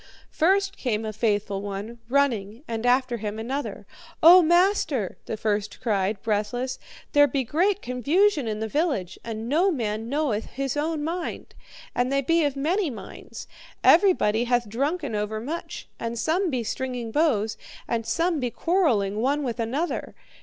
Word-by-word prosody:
"First 390 +4 +2
came 225 -4 -1
a 215 - -4
faithful 205 -3 0
one, 205 +4 -6
running, 240 -4 0
and 230 +1 -2
after 250 -1 +2
him 210 -1 -4
another. 260 +6 -4 0.4
'O 355 +3 +10
master,' 345 - +2
the 220 - -3
first 210 -1 -2
cried, 205 -4 0
breathless, 225 +4 -1 0.3
'there 290 0 +6
be 270 0 -1
great 370 - +1
confusion 285 - +2
in 215 0 -3
the 220 - -1
village, 265 - -1
and 225 0 -5
no 330 +9 +3
man 225 - -2
knoweth 275 -7 0
his 270 0 -3
own 305 +1 -1
mind, 340 +3 -4 0.4
and 245 +2 0
they 275 0 +2
be 330 +4 +3
of 285 -2 -1
many 335 +6 0
minds. 235 - -9 0.4
Everybody 285 - +4
hath 240 -1 +1
drunken 280 - -2
overmuch, 220 +10 -4
and 230 0 -3
some 335 - +1
be 255 -5 -1
stringing 245 0 -4
bows, 225 -8 +1 0.3
and 230 -1 -1
some 330 +6 0
be 250 -2 -1
quarrelling 230 - +1
one 285 +4 +1
with 245 -2 -3
another. 265 +10 -2
250 Hz, 155 wpm, -25 LUFS, 220-310 Hz, 0.4 s, O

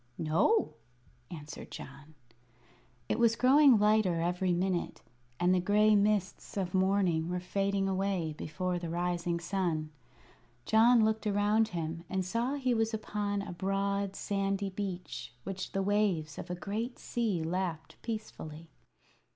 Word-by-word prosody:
"No," 170 - +2 0.6
answered 150 -3 -8
John. 145 +3 -10 0.9
It - - -1
was 230 -1 +4
growing 265 +1 +6
lighter 210 -4 +3
every 180 +2 0
minute, 180 0 -1 0.4
and 180 +1 +3
the 185 - +3
gray 210 +3 +4
mists 205 -1 0
of 185 -2 -2
morning 185 -4 +2
were 180 0 -1
fading 195 +2 0
away 190 -4 -1
before 180 +4 -3
the 170 -1 -5
rising 175 0 -1
sun. 170 -4 -2 0.7
John 225 +1 +5
looked 220 0 0
around 210 +2 +3
him 165 -2 -4
and 190 -1 -1
saw 235 +8 -1
he 260 -3 0
was 225 0 +1
upon 205 -2 -2
a 195 -3 -6
broad, 195 +1 -1
sandy 195 0 -1
beach 185 - -5
which 190 0 -5
the 195 - -1
waves 190 -7 0
of - - -7
a 180 - -2
great 215 +7 -4
sea 215 -9 -1
lapped 165 -1 -3
peacefully. 165 -8 -6
195 Hz, 135 wpm, -31 LUFS, 175-210 Hz, 0.9 s, growing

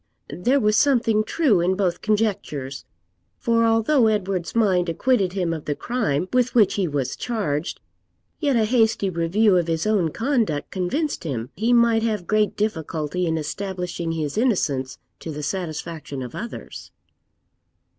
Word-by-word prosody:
There 250 +11 +2
was 210 -3 +2
something 230 -6 +3
true 245 - +2
in 180 +2 +1
both 185 -3 -1
conjectures; 195 -11 -1 0.5
for 230 -1 +2
although 225 +3 +3
Edward's 195 -4 -1
mind 185 -6 +2
acquitted 195 0 +1
him 180 -4 -1
of 160 -2 -6
the 145 - -1
crime 185 - -1
with 250 -1 +2
which 210 -5 +5
he 195 -3 0
was 140 -4 -2
charged, 185 -10 -2 0.6
yet 285 -4 +1
a 225 -2 +3
hasty 220 -4 +2
review 185 +4 +3
of 170 -2 +1
his 165 +1 -1
own 205 -6 +2
conduct 225 - -1
convinced 270 - -2
him 125 -7 -4
he 225 +4 0
might 235 -2 +4
have 215 -5 -1
great 215 +1 +1
difficulty 165 -4 -2
in 160 0 0
establishing 175 +1 -4
his 155 +4 -2
innocence 145 - 0 0.2
to - - -7
the 150 0 -6
satisfaction 160 -4 -4
of 125 - -8
others. 235 +1 -8
195 Hz, 150 wpm, -23 LUFS, 165-225 Hz, 0.6 s, which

